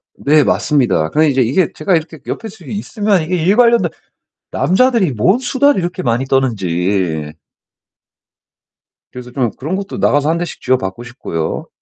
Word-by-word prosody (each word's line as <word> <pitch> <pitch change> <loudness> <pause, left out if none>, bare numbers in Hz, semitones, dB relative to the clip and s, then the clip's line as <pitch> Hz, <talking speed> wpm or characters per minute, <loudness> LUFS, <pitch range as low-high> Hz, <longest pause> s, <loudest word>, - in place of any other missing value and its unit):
네 150 +1 +3
맞습니다. 110 - +1
그러니까 155 - +2
이제 135 -4 +2
이게 140 +9 +1
제가 175 +4 0
이렇게 160 0 -3
옆에서 220 -1 -6
좀 - - -13
있으면 205 -3 -1
이게 180 +3 -2
일 180 +5 +2
관련된 235 -7 +4 0.6
남자들이 190 - +2
뭔 185 - +2
수다를 265 -1 +2
이렇게 175 +1 -3
많이 120 +1 0
떠는지. 95 - -1 1.8
그래서 125 -1 -9
좀 125 -3 0
그런 155 +8 -3
것도 200 +1 -5
나가서 145 +2 +2
1 165 - +1
대씩 175 0 -5
쥐어박고 120 -3 -1
싶고요. 100 -10 -5
150 Hz, 340 characters per minute, -16 LUFS, 120-190 Hz, 1.8 s, 관련된